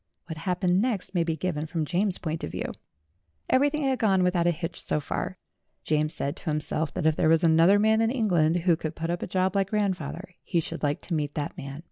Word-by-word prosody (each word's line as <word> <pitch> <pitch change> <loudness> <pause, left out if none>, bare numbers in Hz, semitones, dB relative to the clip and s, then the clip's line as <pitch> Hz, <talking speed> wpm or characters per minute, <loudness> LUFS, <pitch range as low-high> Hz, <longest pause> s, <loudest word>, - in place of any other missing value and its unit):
What 160 - -6
happened 180 +1 +1
next 220 -6 -2
may 175 -3 +2
be 165 -1 -1
given 160 -2 -2
from 165 -1 -2
James's 185 +4 0
point 160 -1 -4
of - - -3
view. - - -4 0.8
Everything 290 +3 +3
had 265 -2 +1
gone 195 -4 +3
without 180 -1 +2
a - - +6
hitch 165 0 -3
so - - 0
far; 185 +5 -4 0.5
James 155 0 +1
said 140 0 -3
to - - -5
himself 150 0 -1
that - - -2
if 160 -1 +4
there 155 - +2
was 165 +1 +4
another 165 +4 +6
man 220 +1 +3
in 225 - +3
Eng 235 -3 0
land 160 -2 +3
who 170 -1 +4
could 155 -1 -5
put 165 +1 -2
up 175 - -3
a - - -3
job 185 +1 0
like 195 -1 +1
grandfather, 185 -4 -2
he 170 - 0
should 165 +1 -5
like 145 -1 0
to 175 - -5
meet 145 -2 -1
that 145 -2 -3
man. 140 +1 -7
170 Hz, 235 wpm, -27 LUFS, 155-195 Hz, 0.8 s, a